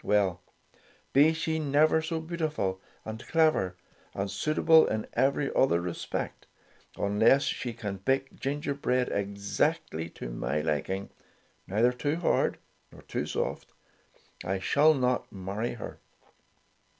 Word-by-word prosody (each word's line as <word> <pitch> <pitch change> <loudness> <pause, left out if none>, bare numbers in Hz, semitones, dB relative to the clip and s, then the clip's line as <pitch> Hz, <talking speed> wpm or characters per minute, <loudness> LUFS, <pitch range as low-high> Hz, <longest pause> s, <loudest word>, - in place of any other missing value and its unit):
Well, 100 -3 +2 0.7
be 145 +4 +6
she 160 0 -1
never 155 +2 +3
so 160 +1 -2
beautiful, 155 - -2 0.2
and 110 +1 -6
clever, 155 - +2 0.4
and 95 0 -2
suitable 155 +8 +4
in 110 0 -2
every 135 +3 +1
other 130 -10 +3
respect, 85 0 -4 0.5
unless 110 +7 +4
she 120 - -2
can 105 -4 -5
bake 135 +7 0
gingerbread 140 -3 -1
exactly 100 - -1
to - - -7
my 70 +5 -1
liking, 80 +6 -2 0.6
neither 110 +6 +3
too 145 +5 -1
hard 170 0 +1 0.3
nor - - -15
too - - -3
soft, - - -3 0.7
I 95 +2 -1
shall 150 +11 +4
not 125 -2 0
marry 100 +4 -3
her." 120 - -8
120 Hz, 120 wpm, -29 LUFS, 100-150 Hz, 0.7 s, be